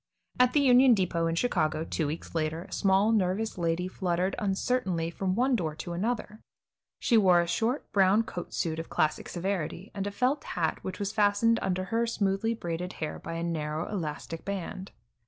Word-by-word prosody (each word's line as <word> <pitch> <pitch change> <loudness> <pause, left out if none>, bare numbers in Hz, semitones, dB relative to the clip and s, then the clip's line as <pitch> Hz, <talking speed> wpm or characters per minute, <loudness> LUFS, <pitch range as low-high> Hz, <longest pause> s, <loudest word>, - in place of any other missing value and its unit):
At 250 0 +5
the 295 - +4
Union 255 -2 +6
Depot 170 -4 0
in 165 - 0
Chicago, 160 -7 +1
two 160 -1 -2
weeks 155 +3 -6
later, 160 0 -1
a - - -16
small, 195 +2 +3
nervous 210 +1 +1
lady 170 +1 0
fluttered 185 0 -1
uncertainly 190 -4 0
from 185 +1 -1
one 255 +3 +3
door 160 -8 -2
to 175 - -6
another. 215 +3 -3 0.6
She 235 - +3
wore 185 -4 +6
a 170 - +2
short, 225 +10 -1
brown 200 +2 +4
coat 175 -5 -7
suit 160 -1 -2
of 165 - -6
classic 155 0 0
severity, 185 0 -3
and 200 0 -3
a - - -3
felt 255 +7 0
hat 165 -3 -1
which 185 -1 -5
was 200 -1 -2
fastened 215 +2 +3
under 185 -1 -1
her 230 +1 +2
smoothly 215 0 0
braided 175 -2 -4
hair 155 -1 -5
by - - -6
a 165 0 -3
narrow 155 -2 -2
elastic 165 -3 -4
band. 195 0 -5
190 Hz, 185 wpm, -29 LUFS, 165-215 Hz, 0.6 s, Union